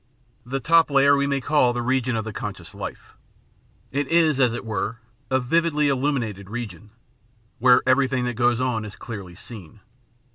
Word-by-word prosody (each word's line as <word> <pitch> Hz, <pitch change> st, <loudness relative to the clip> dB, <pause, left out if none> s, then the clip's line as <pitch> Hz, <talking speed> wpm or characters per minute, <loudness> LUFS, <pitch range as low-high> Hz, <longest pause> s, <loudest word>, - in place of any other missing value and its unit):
The 135 Hz, +2 st, -2 dB
top 165 Hz, +5 st, +4 dB
layer 140 Hz, 0 st, +5 dB
we 140 Hz, 0 st, +1 dB
may 140 Hz, -1 st, 0 dB
call 130 Hz, -3 st, +2 dB
the 120 Hz, 0 st, -2 dB
region 130 Hz, -1 st, 0 dB
of 110 Hz, -1 st, -2 dB
the 110 Hz, -, -6 dB
conscious -, -, -7 dB
life. -, -, -8 dB, 0.8 s
It 145 Hz, +1 st, -1 dB
is, 160 Hz, -3 st, +3 dB
as 125 Hz, -3 st, +4 dB
it 120 Hz, -, -6 dB
were, 110 Hz, +1 st, -3 dB, 0.3 s
a 130 Hz, -, +2 dB
vividly 150 Hz, +2 st, +1 dB
illuminated 125 Hz, -8 st, -1 dB
region, 110 Hz, -3 st, -7 dB, 0.7 s
where 125 Hz, +1 st, +5 dB
everything 130 Hz, -1 st, +2 dB
that 125 Hz, -, -2 dB
goes 120 Hz, 0 st, +2 dB
on 125 Hz, -4 st, -1 dB
is 105 Hz, -2 st, -8 dB
clearly 100 Hz, -6 st, -8 dB
seen. 105 Hz, -2 st, -12 dB
125 Hz, 170 wpm, -23 LUFS, 115-140 Hz, 0.8 s, layer